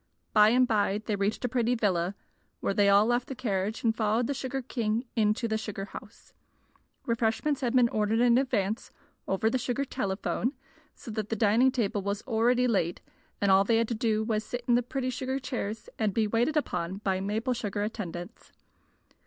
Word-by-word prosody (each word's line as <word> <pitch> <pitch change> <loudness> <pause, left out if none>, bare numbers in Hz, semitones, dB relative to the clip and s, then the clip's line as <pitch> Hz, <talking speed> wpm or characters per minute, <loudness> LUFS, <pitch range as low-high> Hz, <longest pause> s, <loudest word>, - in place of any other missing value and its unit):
By 210 0 +7
and 250 +2 +4
by 210 -1 +1
they 215 - 0
reached 200 +5 -1
a - - +2
pretty 245 0 +1
villa, 190 -4 0 0.4
where - - -1
they 200 -1 +4
all 200 +1 +6
left 240 +1 +1
the 270 - -5
carriage 210 -3 -2
and 225 -2 +2
followed 220 +2 +1
the 280 - -1
sugar 265 0 -4
king 230 -1 -1
into 215 +1 +1
the 220 -1 -1
sugar 205 -3 -5
house. 220 +2 -12 0.7
Refreshments 235 +5 0
had 250 -1 0
been 250 -2 +6
ordered 215 +1 +1
in 240 0 +5
advance, 220 -5 -1 0.4
over 195 +3 +1
the 255 +3 +1
sugar 250 +3 -1
telephone, 205 +4 -2 0.4
so 230 - -9
that 215 -1 -3
the 225 - -1
dining 225 +5 +4
table 215 -5 -1
was 200 +1 -3
already 245 +1 +2
laid 180 -7 0 0.4
and 200 -1 +3
all 190 +1 +6
they 225 +3 +2
had 230 0 +2
to - - 0
do 220 -1 0
was 215 -1 0
to - - -17
sit 245 0 -4
in 240 - +4
the 240 - +4
pretty 255 +1 -3
sugar 260 +1 -2
chairs 225 -5 -4
and 215 -3 0
be 225 - +3
waited 235 +8 +1
upon 185 - -2
by 190 -2 -1
maple 215 +6 -1
sugar 205 -3 -3
attendants. 205 -2 -6
225 Hz, 195 wpm, -28 LUFS, 205-245 Hz, 0.7 s, By